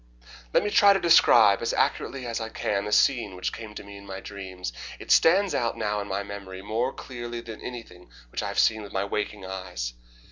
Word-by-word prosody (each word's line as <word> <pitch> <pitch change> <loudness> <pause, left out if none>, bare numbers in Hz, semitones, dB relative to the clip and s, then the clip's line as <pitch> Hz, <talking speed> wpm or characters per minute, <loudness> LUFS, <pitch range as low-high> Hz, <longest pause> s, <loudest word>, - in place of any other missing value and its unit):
Let - - +3
me 210 - -1
try 205 -3 +7
to 195 - +1
describe 115 - +6
as 115 - -1
accurately 130 -2 0
as 115 -1 -3
I 110 - -4
can 100 -2 -2
the 105 - -4
scene 115 -6 +3
which 90 - -3
came 110 -2 -8
to - - -7
me 100 0 -11
in 100 0 -13
my 95 0 -6
dreams. 95 -9 -7 0.2
It - - -6
stands 190 +4 +5
out 115 -1 -1
now 105 0 -1
in 100 - -6
my 100 +1 -2
memory 95 -2 -8
more 115 +5 -1
clearly 120 -3 -7
than 115 -2 -9
anything 115 -8 -9 0.2
which - - -3
I - - -3
have - - -5
seen 110 -1 +3
with 100 - -10
my 95 +1 0
waking 105 -1 -3
eyes. 90 -11 -5
105 Hz, 220 wpm, -26 LUFS, 100-120 Hz, 0.2 s, try